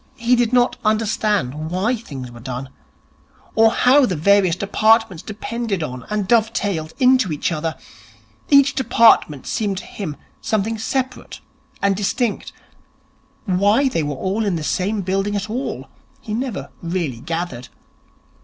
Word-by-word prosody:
He 240 0 +3
did 240 -1 +1
not 245 0 +3
understand 210 - 0
why 195 +8 0
things 135 - -8
were 120 - -12
done, 130 +2 -6 0.8
or 225 0 +5
how 255 +4 +4
the 185 - -1
various 185 +2 +3
departments 210 -1 +2
depended 215 -3 -4
on 125 -4 -6
and 210 -2 -1
dove 225 -1 +3
tailed 165 -9 -2
into 255 -5 +4
one 150 - -2
another. 160 -1 -2 0.7
Each 280 0 +5
department 230 - +3
seemed 205 -4 -2
to - - -6
him 165 -8 -6 0.3
something 220 +1 -1
separate 260 +3 -3 0.4
and 200 -1 +3
distinct. 215 +3 -1 0.9
Why 205 +7 +3
they 165 - -1
were 145 -1 -3
all 195 +9 -1
in 200 -4 0
the 160 - -3
same 200 +6 -1
building 195 +2 -1
at 205 +1 -3
all 255 +4 -4 0.3
he 215 - -6
never 240 -3 -4
really 170 -8 -3
gathered. 160 -4 -4
205 Hz, 145 wpm, -20 LUFS, 165-230 Hz, 0.9 s, or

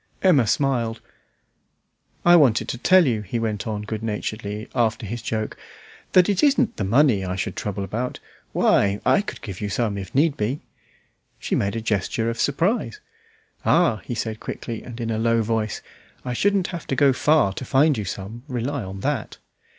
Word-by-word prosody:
Emma 150 - +5
smiled. 120 -4 0 1.3
"I 175 0 +8
wanted 130 -9 +4
to 120 - -4
tell 185 +5 +5
you," 115 -5 0
he 105 +4 -4
went 110 -2 -2
on 105 -1 -3
good 110 0 -4
naturedly, 105 0 -4
after 115 0 0
his 115 +4 -5
joke, 110 -1 -3 0.6
"that 180 -1 +6
it 200 -2 +1
isn't 275 -5 +3
the - - -1
money 115 0 +3
I 90 0 -3
should 95 - -3
trouble 100 -1 -3
about. 115 +6 -3 0.3
Why, 100 0 +3
I - - +4
could 205 - -8
give 100 -4 -7
you 105 - -2
some, 105 -1 -1
if 95 - -9
need 145 +1 +3
be." 120 +8 -2 0.8
She - - -4
made 100 +2 0
a 115 - -2
gesture 110 +2 -1
of 115 - -4
surprise. 185 - 0 0.6
"Ah!" 165 -11 +3
said 110 -1 -3
he - - -32
quickly 115 -2 -6
and 120 -1 -9
in 115 -1 -2
a 110 - -1
low 115 0 +2
voice, 110 -1 -2 0.4
"I 125 - -2
shouldn't 195 +6 +1
have 170 - -6
to 135 - -1
go 140 0 +4
far 150 -7 +3
to 130 - -6
find 140 +4 +3
you 105 -3 -3
some, 100 +5 -6
rely 130 +1 -2
on 95 0 -7
that." 140 -4 -2
115 Hz, 185 wpm, -23 LUFS, 105-140 Hz, 1.3 s, I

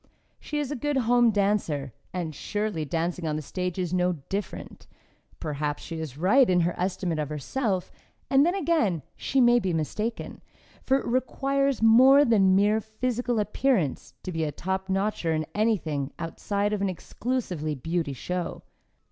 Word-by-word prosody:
She 300 - -5
is 295 -2 -2
a - - -1
good 290 +2 -1
home 240 -1 +4
dancer, 195 - 0 0.2
and 175 -4 -3
surely 205 +1 -2
dancing 165 +2 -2
on 150 - -1
the 155 - -3
stage 180 +3 -3
is 180 -2 -2
no 180 0 +2 0.2
different! 200 +1 -5 0.5
Perhaps 150 -1 -3
she 165 -1 -6
is 150 -4 -6
right 205 - +4
in 180 -1 +4
her 170 +1 +1
estimate 180 -3 -2
of 150 -2 -2
herself, 185 - -2 0.4
and 270 +1 +5
then 350 +4 +2
again 270 - +1
she 270 - 0
may 240 -1 +6
be 190 -5 -1
mistaken, 210 +9 -3 0.4
for 270 - +2
it - - -5
requires 275 +1 0
more 260 +6 +7
than 195 -6 +4
mere 210 +3 +3
physical 240 +2 -2
appearance 210 - 0
to 185 - -4
be 165 -2 -1
a 150 - -1
top 190 +4 -3
notcher 195 -4 0
in 155 0 -1
anything 160 -11 0
outside 200 +5 -2
of 205 - -1
an 200 - +1
exclusively 180 - -3
beauty 160 +1 -2
show. 180 +6 -4
195 Hz, 165 wpm, -26 LUFS, 165-240 Hz, 0.5 s, more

